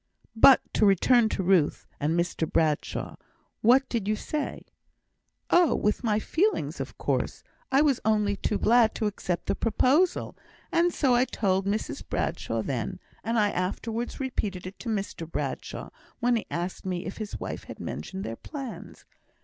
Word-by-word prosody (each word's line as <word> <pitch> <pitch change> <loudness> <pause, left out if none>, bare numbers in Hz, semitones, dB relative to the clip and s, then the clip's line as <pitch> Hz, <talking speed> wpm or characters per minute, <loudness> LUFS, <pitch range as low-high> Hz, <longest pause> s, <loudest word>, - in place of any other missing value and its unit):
"But 260 +3 +8
to - - +2
return 220 +4 +5
to 190 - -2
Ruth 180 -5 +2
and 160 +4 +1
Mr 170 -2 -1
Bradshaw. 155 -2 0 0.4
What 255 +4 +5
did 225 -5 -2
you 215 - +2
say?" 300 +7 -4 0.9
"Oh! 350 -3 +5
with 210 +4 0
my 215 -3 +2
feelings, 370 - 0
of - - -6
course, - - -1 0.3
I 275 +2 +5
was 280 -5 +3
only 210 -2 +2
too 205 +1 -1
glad 230 -1 +4
to 220 - -1
accept 180 -4 -2
the - - +1
proposal, 265 - +2 0.4
and 345 +1 +3
so 270 -6 +2
I 245 +1 +4
told 195 -5 0
Mrs 210 +2 -2
Bradshaw - - -2
then; - - -3 0.2
and 230 +1 0
I 205 -2 +3
afterwards 225 +6 -3
repeated 210 -9 -3
it 185 +2 -8
to 240 - -5
Mr 195 -6 -3
Bradshaw, - - -4 0.3
when 245 0 +2
he 225 - -2
asked 175 +2 -4
me 180 -2 -3
if 190 - -6
his 215 -2 -5
wife - - -5
had - - -9
mentioned 190 0 -5
their 115 - -5
plans. 275 -5 -8
215 Hz, 165 wpm, -27 LUFS, 190-245 Hz, 0.9 s, But